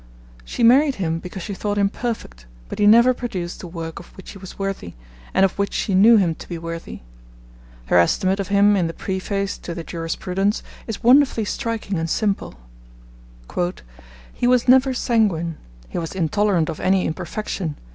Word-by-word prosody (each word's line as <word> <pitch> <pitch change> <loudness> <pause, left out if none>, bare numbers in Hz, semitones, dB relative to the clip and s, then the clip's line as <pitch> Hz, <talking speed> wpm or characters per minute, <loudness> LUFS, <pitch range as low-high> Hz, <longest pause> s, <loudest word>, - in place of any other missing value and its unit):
She - - -3
married 270 +4 +5
him 165 -4 -2
because 180 +1 -8
she 205 - -5
thought 205 +1 -3
him 200 -1 +3
perfect, 195 - -5 0.2
but - - -6
he 205 - +4
never 235 +4 +7
produced 185 -9 -5
the 180 - -8
work 165 -1 -6
of 170 - -12
which 190 - -10
he 195 - -11
was 190 -1 -11
worthy, 195 - -4 0.4
and 195 - +4
of 190 - -1
which 200 - -1
she 200 - -1
knew 220 +5 +7
him 180 -5 +2
to - - -11
be 170 - -4
worthy. 165 0 -7 0.8
Her 90 - +4
estimate 185 - +2
of 195 - -2
him 205 +1 +4
in 180 -4 +1
the 165 - -6
preface 195 +1 -3
to 170 - -6
the 170 - -5
Jurisprudence 180 +5 -2 0.2
is 225 - -5
wonderfully 250 -2 +5
striking 215 -4 -3
and 165 0 -2
simple. 200 - -1 1.8
'He 245 - 0
was 250 0 +3
never 260 +1 +5
sanguine. 190 -10 +1 0.3
He - - -4
was 165 -1 -5
intolerant 185 -1 +1
of 160 - -5
any 190 0 +2
imperfection. 175 -1 -4
195 Hz, 175 wpm, -21 LUFS, 170-215 Hz, 1.8 s, never